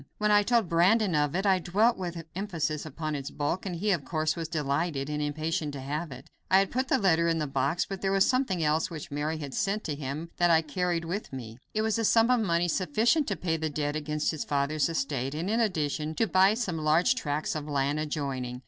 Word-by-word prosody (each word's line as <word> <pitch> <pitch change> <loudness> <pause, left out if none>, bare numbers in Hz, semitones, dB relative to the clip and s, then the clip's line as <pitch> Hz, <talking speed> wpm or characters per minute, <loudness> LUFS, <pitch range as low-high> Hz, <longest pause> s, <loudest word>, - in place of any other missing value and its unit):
When 210 0 +1
I 205 0 +6
told 230 -1 +2
Brandon 185 +4 +3
of 150 0 +1
it, 190 +2 0
I 190 -2 +4
dwelt 210 +7 +2
with 175 -2 -5
emphasis 165 -6 -2
upon 155 0 -4
its 140 -1 -4
bulk, 165 +7 -2
and 180 - -3
he, 205 +5 0
of 170 -7 0
course, 155 +2 -1
was 165 -2 -4
delighted, 150 -1 -1
and 150 0 -2
impatient 155 +1 -2
to 140 - -6
have 150 +4 -4
it. 130 - -10 0.2
I 190 - +6
had 195 -1 +2
put 260 +2 -1
the 270 - +3
letter 170 -6 +3
in 165 -1 +1
the 155 - -1
box, 140 +5 0
but 195 -1 -6
there 195 - 0
was 195 0 +4
something 255 -10 +1
else 155 +1 +1
which 155 -4 -8
Mary 150 +2 -2
had 145 -4 -6
sent 205 +2 -1
to 155 - -3
him 145 +4 -5
that 175 0 +3
I 165 - +6
had 160 -1 +1
carried 175 +1 -1
with 185 +6 -4
me. 120 -3 -8 0.2
It 215 - +1
was 220 0 0
a - - 0
sum 225 +2 +4
of 250 - +4
money 175 -4 +1
sufficient 235 - +2
to 200 - -1
pay 165 -3 -1
the 160 0 -2
debt 145 0 -2
against 150 0 -1
his 155 - -4
father's 145 +2 0
estate, 135 -3 -2
and 170 +6 -2
in 225 - +1
addition, 155 -7 -1
to 225 - +2
buy 190 +1 +4
some 190 -9 -2
large 155 +9 +3
tracts 150 - -2
of 150 -1 -5
land 145 0 0
adjoining. 135 -5 -3
165 Hz, 240 wpm, -28 LUFS, 150-195 Hz, 0.2 s, I